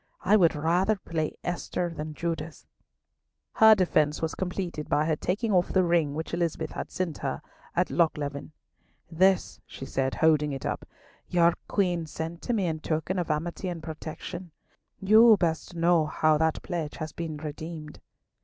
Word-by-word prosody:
I 195 +3 +4
would 170 -6 +4
rather 175 +7 +2
play 160 -5 -3
Esther 175 0 -2
than 155 0 -5
Judith." 165 -1 -4 0.9
Her 220 0 +7
defence 155 -6 +2
was 160 0 -2
completed 180 -4 -4
by 150 - +2
her 160 -1 +1
taking 205 +8 -1
off 180 -2 +2
the 185 - +4
ring 170 -4 +1
which 160 +2 -5
Elizabeth 165 -2 -1
had - - -5
sent 180 -5 -3
to - - -15
her - - -3 0.3
at - - +1
Lochleven. 150 -4 0 0.6
"This," 185 +3 +2
she 135 - -8
said, 135 0 -1
holding 150 -2 +3
it 135 - -6
up, - - -3 0.4
"your 170 -1 +4
Queen 175 -5 0
sent 165 +2 -6
to 245 - -2
me 205 -5 +1
in 160 -2 -2
token 160 +4 -2
of 175 - -3
amity 170 +5 -2
and 170 -3 -5
protection. 160 +3 -7 0.5
You 215 +3 +7
best 165 0 -1
know 165 -2 +3
how 155 0 +2
that 160 -1 0
pledge 165 -4 -4
has 155 -1 -5
been 160 -2 -5
redeemed." 155 +1 -7
165 Hz, 165 wpm, -27 LUFS, 155-180 Hz, 0.9 s, Her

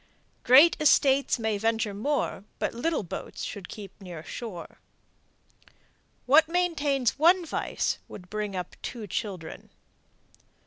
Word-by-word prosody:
Great 275 +7 +7
estates 280 -3 +4
may 220 -3 -1
venture 225 -1 0
more, 220 -2 -2
but - - -2
little 300 +3 -1
boats 170 - -7
should 195 -3 -6
keep 200 -2 -10
near 175 -4 -8
shore. 190 -3 -8 1.5
What 310 +5 +6
maintains 295 -8 0
one 345 +3 +5
vice - - -2
would 180 - -11
bring 210 0 -4
up 180 -1 -5
two 230 -4 -6
children. 190 -4 -5
230 Hz, 120 wpm, -27 LUFS, 200-290 Hz, 1.5 s, Great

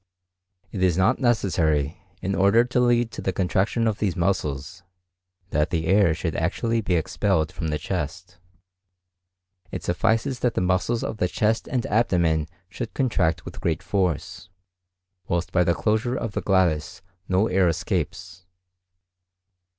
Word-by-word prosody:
It 95 - -4
is 90 -2 +3
not 95 +7 +3
necessary, 90 - +1 0.2
in 95 - -1
order 100 +5 +4
to 125 0 -1
lead 120 -1 +2
to - - -7
the 95 - -1
contraction 95 +5 0
of 110 -2 0
these 95 -5 0
muscles, 85 -2 -2 0.7
that 75 +3 +1
air 85 +1 +3
should 80 -3 -3
actually 115 +7 0
be 95 -4 0
expelled 80 0 0
from 80 - -4
the 75 -1 -1
chest; 90 +2 -5 1.3
it - - -6
suffices 115 +8 0
that 120 -2 0
the - - +1
muscles 95 +6 0
of - - -4
the 90 - +1
chest 110 +5 0
and 125 -2 -1
abdomen 85 -8 +1 0.2
should 95 - -7
contract 90 - 0
with - - -9
great 85 +2 -1
force, 90 -3 -2 0.8
whilst 85 +1 -1
by 90 - +3
the 85 -1 +1
closure 110 +3 0
of 115 - -3
the - - -3
glottis 90 -6 +1 0.3
no 95 +3 +3
air 95 -2 +2
escapes. 90 +1 -3
95 Hz, 145 wpm, -24 LUFS, 85-110 Hz, 1.3 s, order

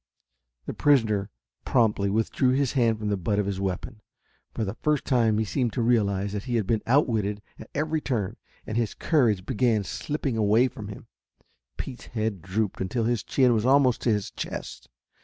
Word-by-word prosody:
The - - -4
prisoner 110 -8 +2 0.3
promptly 105 -5 +2
withdrew 115 +5 +1
his 135 -1 +1
hand 115 -4 +2
from 105 -1 -3
the 100 - 0
butt 100 +3 -1
of 105 - +1
his 100 -1 -3
weapon. 100 +4 -4 0.5
For 110 - -2
the 95 - -3
first 150 +4 0
time 115 -5 +2
he 110 - +1
seemed 120 0 -1
to 125 - -1
realize 100 -4 +1
that 105 +1 -4
he 125 -2 -2
had 110 -4 +1
been 110 +3 +1
outwitted 110 -6 +2 0.2
at - - -11
every 155 +2 0
turn, 110 -10 -2 0.3
and 110 - -3
his 115 -3 -1
courage 115 - +2
began 110 -1 +1
slipping 140 +3 -3
away 110 +4 +4
from 105 -3 -9
him. 100 - -9 0.7
Pete's 125 -2 -7
head 110 -5 -2
drooped 95 +3 -2
until 115 +5 -1
his 115 -1 0
chin 130 -3 +3
was 110 -2 +1
almost 130 -1 +4
to - - +1
his 105 0 -1
chest. - - -7
110 Hz, 185 wpm, -26 LUFS, 105-125 Hz, 0.7 s, away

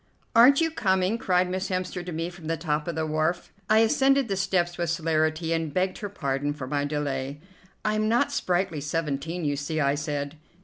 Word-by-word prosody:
"Aren't 260 +6 +7
you 325 0 +2
coming?" 190 -4 +1
cried 180 -3 +2
Miss 185 +1 -3
Hemster 185 -1 -2
to 180 - -6
me 165 +2 -3
from 175 -3 -11
the 165 0 0
top 150 -1 -2
of 170 - -2
the 160 0 -1
wharf. 155 +3 -1 0.2
I 215 +1 +6
ascended 270 +2 +3
the 195 - 0
steps 185 -2 0
with 170 -2 -2
celerity 160 0 0
and 165 -2 -1
begged 185 +3 0
her 205 - -4
pardon 145 -6 -2
for 145 -3 -6
my 145 +2 -1
delay. 145 -1 -3 0.5
"I 215 - +2
am 215 0 +1
not 235 +2 +2
sprightly 175 -4 0
seventeen, 160 +2 -2
you 145 -1 +1
see," 145 +3 -3
I 140 -1 +3
said. 145 0 -3
165 Hz, 205 wpm, -26 LUFS, 150-190 Hz, 0.5 s, Aren't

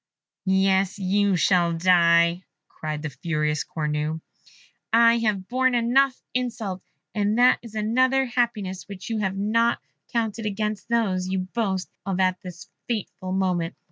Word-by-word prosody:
"Yes, 190 0 +2
you 200 0 +1
shall 175 -1 +3
die," 170 0 +4 0.3
cried 155 -1 -6
the 155 - -4
furious 150 0 -1
Cornue; 150 0 -2 0.7
"I 230 +1 +5
have 205 -4 -1
borne 255 0 +1
enough 255 +3 +2
insults, 230 -7 -3 0.3
and 210 +1 0
that 250 +1 +5
is 230 -2 -12
another 255 +5 +2
happiness 230 -7 -2
which 200 +2 -8
you 220 - -1
have 195 -2 -1
not 230 +4 +1 0.3
counted 225 -1 -1
amongst 210 0 -3
those 195 -6 +1
you 190 0 -1
boast 195 -5 -1 0.2
of 195 -1 -2
at 185 -1 +1
this 180 -1 -10 0.2
fatal 205 -5 -4
moment!" 180 -3 0
195 Hz, 140 wpm, -24 LUFS, 180-230 Hz, 0.7 s, I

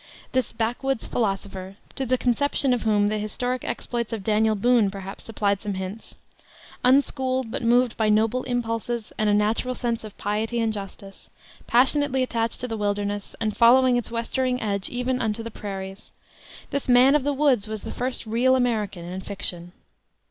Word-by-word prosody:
This 255 -1 0
backwoods 245 +3 -1
philosopher 195 -3 -3 0.2
to 265 - -3
the 255 +2 +2
conception 265 +2 +2
of 245 - -1
whom 210 -2 +2
the 215 +1 -1
historic 245 +4 -3
exploits 235 -2 -3
of 220 -4 -4
Daniel 215 +1 +2
Boone 230 0 +3
perhaps 195 0 -8
supplied 200 -3 0
some 205 -3 -3
hints; 190 +4 -7 0.7
unschooled, 260 -2 +2
but 265 - -3
moved 240 0 +3
by 220 -1 +2
noble 220 +4 +2
impulses 235 -1 -2
and 215 -1 +2
a - - +3
natural 220 +4 +1
sense 235 -2 -2
of 215 -2 -10
piety 220 +3 -1
and 225 -1 +1
justice; 195 -1 -9 0.4
passionately 265 +2 +3
attached 230 -2 -1
to 250 - -2
the 225 -2 -4
wilderness, 205 -1 -2
and 215 -2 -1
following 250 +2 +6
its 245 - -1
westering 250 +2 -1
edge 200 -3 -2
even 250 +1 -1
unto 225 0 -1
the 230 - -6
prairies 195 -2 -7 0.6
this 280 -2 -2
man 250 +2 +6
of 295 -2 +3
the 290 - +1
woods 270 -7 +2
was 215 -1 -5
the - - -6
first 250 -1 -3
real 240 +4 +3
American 215 -8 -1
in 185 +2 -5
fiction. 180 -3 -3
225 Hz, 170 wpm, -24 LUFS, 205-250 Hz, 0.7 s, following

